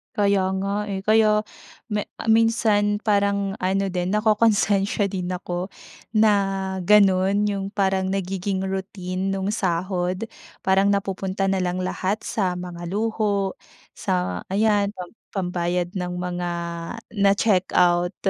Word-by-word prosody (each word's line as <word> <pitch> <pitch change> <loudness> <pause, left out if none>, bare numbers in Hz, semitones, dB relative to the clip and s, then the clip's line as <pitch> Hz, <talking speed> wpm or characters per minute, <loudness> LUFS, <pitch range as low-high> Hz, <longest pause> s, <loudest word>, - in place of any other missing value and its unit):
Kaya 200 -2 +2 0.2
nga, 205 +1 -2
eh. 195 -1 -4
Kaya 215 0 +4 0.5
me 210 -1 -1 0.2
minsan 215 -2 +3
parang 200 -1 +1
ano 195 +1 0
din 180 +2 -1
nakokonsensiya 210 -2 +2
din 185 -2 -3
ako 180 0 -3 0.5
na 215 0 +5 0.6
ganu'n 200 -1 +4
'yung 195 -1 -3
parang 190 -2 0
nagiging 190 0 -2
routine 190 -1 -3
nung 195 +1 -1
sahod. 185 0 -1 0.4
Parang 190 +1 +3
napupunta 195 -1 0
na 195 - +1
lang 180 0 -1
lahat 190 +3 -2
sa 185 -4 -1
mga 175 -1 -6
luho, 205 -1 -1 0.3
sa 90 0 -2
ayan 205 +1 +2
pam 180 -1 -8 0.2
pambayad 180 -1 -1
ng 180 0 -3
mga 180 0 -3 0.7
na-check 195 -1 +3
out. 175 0 +3
195 Hz, 120 wpm, -23 LUFS, 180-205 Hz, 0.7 s, na